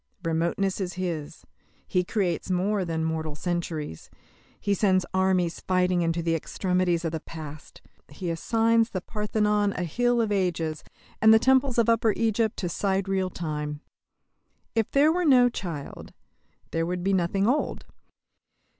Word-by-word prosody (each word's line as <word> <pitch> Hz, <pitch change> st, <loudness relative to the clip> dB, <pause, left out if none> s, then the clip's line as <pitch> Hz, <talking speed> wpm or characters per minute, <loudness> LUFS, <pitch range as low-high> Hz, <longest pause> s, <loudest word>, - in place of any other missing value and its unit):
Remoteness 170 Hz, +4 st, 0 dB
is 180 Hz, -1 st, -3 dB
his. 170 Hz, -5 st, -5 dB, 0.4 s
He 180 Hz, -1 st, +1 dB
creates 180 Hz, -4 st, -1 dB
more 190 Hz, +2 st, +1 dB
than 165 Hz, -2 st, -2 dB
mortal 160 Hz, -2 st, -3 dB
centuries. 165 Hz, -, -4 dB, 0.5 s
He 200 Hz, -, 0 dB
sends 185 Hz, -2 st, +2 dB
armies 185 Hz, -2 st, +1 dB
fighting 180 Hz, -1 st, +1 dB
into 165 Hz, 0 st, 0 dB
the 165 Hz, 0 st, +1 dB
extremities 180 Hz, +1 st, 0 dB
of 165 Hz, -, -1 dB
the 160 Hz, -, -3 dB
past. 155 Hz, -2 st, -10 dB, 0.3 s
He 170 Hz, +4 st, -4 dB
assigns 225 Hz, +6 st, +2 dB
the 185 Hz, -, -4 dB
Parthenon 210 Hz, -1 st, 0 dB
to -, -, -5 dB
a -, -, -1 dB
hill 245 Hz, +8 st, +1 dB
of 225 Hz, -2 st, +1 dB
ages, 170 Hz, -5 st, -1 dB, 0.4 s
and 220 Hz, -, +7 dB
the 220 Hz, -, +8 dB
temples 260 Hz, +1 st, +3 dB
of 235 Hz, -1 st, +3 dB
Upper 230 Hz, -2 st, +3 dB
Egypt 225 Hz, 0 st, +1 dB
to 180 Hz, -, -2 dB
sidereal 190 Hz, +1 st, 0 dB
time. 150 Hz, -3 st, -4 dB, 0.9 s
If 225 Hz, -2 st, 0 dB
there 290 Hz, +3 st, +4 dB
were 360 Hz, +2 st, 0 dB
no 255 Hz, -6 st, +6 dB
child, 170 Hz, -11 st, -7 dB, 0.6 s
there 165 Hz, 0 st, -1 dB
would 180 Hz, 0 st, -3 dB
be 195 Hz, +1 st, +1 dB
nothing 190 Hz, +2 st, +1 dB
old. 270 Hz, +5 st, 0 dB
185 Hz, 150 wpm, -26 LUFS, 165-210 Hz, 0.9 s, the